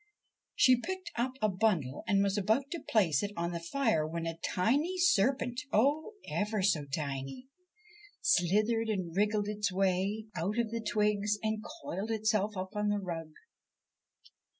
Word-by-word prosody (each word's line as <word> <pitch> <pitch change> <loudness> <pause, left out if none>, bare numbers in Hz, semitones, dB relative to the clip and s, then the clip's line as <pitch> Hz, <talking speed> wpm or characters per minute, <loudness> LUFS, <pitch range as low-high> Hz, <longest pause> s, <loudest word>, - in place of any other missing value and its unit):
She 255 -1 +5
picked 375 +3 -5
up 245 +2 -1
a - - +5
bundle 185 - 0
and 200 -1 +3
was 200 -1 +1
about 220 +8 +1
to 340 - -3
place 175 -10 +3
it 205 - -2
on 170 0 -1
the 170 - -3
fire 170 - 0
when 165 +1 -4
a 165 0 -4
tiny 285 - +1
serpent, 260 - +2
oh, 290 - +2
ever 210 -1 -1
so 160 -7 +2
tiny 140 - -4
1 - - -35 0.7
slithered 215 +6 +2
and 185 -6 -2
wriggled 210 +1 +1
its 210 -1 -1
way 195 +3 0
out 185 +6 -2
of 235 -2 0
the 230 0 -2
twigs 210 -1 +1
and 215 0 -1 0.2
coiled 195 +5 -4
itself 215 -2 0
up 185 0 -4
on 210 0 0
the 205 - +1
rug. 170 -5 -5
210 Hz, 160 wpm, -31 LUFS, 180-225 Hz, 0.7 s, She